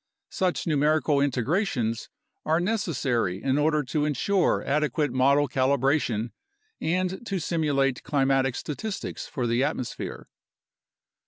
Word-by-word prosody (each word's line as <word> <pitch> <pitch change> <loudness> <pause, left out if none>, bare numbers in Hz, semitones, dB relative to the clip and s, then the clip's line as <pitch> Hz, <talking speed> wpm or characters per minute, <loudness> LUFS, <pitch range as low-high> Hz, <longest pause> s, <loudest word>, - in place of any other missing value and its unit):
Such 185 -2 -1
numerical 150 -1 +2
integrations 130 - 0 0.3
are 160 +2 +2
necessary 140 - -1
in 135 +1 +1
order 150 0 +2
to 145 +3 -1
ensure 160 +6 +1
adequate 150 0 0
model 140 +3 +3
calibration 130 -3 +1 0.5
and 185 +5 -1
to 195 - -1
simulate 145 -6 0
climatic 135 -3 +1
statistics 195 +11 -5
for 125 - -3
the 120 +2 +1
atmosphere. 130 -3 -4
145 Hz, 105 wpm, -26 LUFS, 130-160 Hz, 0.5 s, model